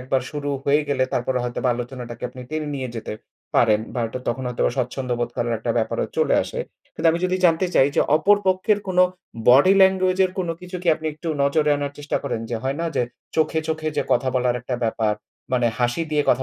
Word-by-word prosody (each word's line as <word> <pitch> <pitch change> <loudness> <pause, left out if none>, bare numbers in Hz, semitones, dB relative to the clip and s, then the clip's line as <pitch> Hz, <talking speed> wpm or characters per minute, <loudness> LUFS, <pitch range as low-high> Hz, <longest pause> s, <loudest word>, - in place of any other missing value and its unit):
একবার 130 0 0
শুরু 145 -1 -3
হয়ে 145 +2 +4
গেলে, 140 -2 +2
তারপরে 125 +1 0
হয়তোবা 125 +1 -1
আলোচনাটাকে 120 -1 -7
আপনি 125 0 -11
টেনে 155 -1 -3
নিয়ে 130 -2 -3
যেতে 110 - -5 0.4
পারেন। 110 -2 +4
ভা 125 - -1
ওইটা 120 +3 -5
তখন 125 +2 -2
হয়তোবা 125 - 0
স্বাচ্ছন্দ্যবোধ 125 -1 -2
করার 120 0 0
একটা 115 +2 -2
ব্যাপারও 110 0 -1
চলে - - +3
আসে। - - -6 0.4
কিন্তু 165 - 0
আমি 170 - -1
যদি 185 0 +1
জানতে 170 +1 +4
চাই 135 - +5
যে, - - +5 0.2
অপর 200 +7 +4
পক্ষের 190 +3 +2
কোনো 180 -1 +4 0.5
body 140 +10 +7
language 190 0 +3
এর 185 - 0
কোন 180 -2 -1
কিছু 180 0 -7
কি 175 - -1
আপনি 160 0 -7
একটু 160 +2 -6
নজরে 150 +2 +2
আনার 145 0 -3
চেষ্টা 145 0 -2
করেন। 110 - -2
যে 115 - -1
হয় 135 +1 -1
না 170 - -1
যে - - +3 0.3
চোখে, 160 0 +2
চোখে 155 0 -1
যে - - +2
কথা 130 - +2
বলার 125 -1 +2
একটা 125 +1 -4
ব্যাপার। 110 -1 0 0.4
মানে 125 -2 +3
হাসি 120 +6 +1
দিয়ে 150 -1 +2
কথা 130 - +2
140 Hz, 210 wpm, -22 LUFS, 125-160 Hz, 0.5 s, body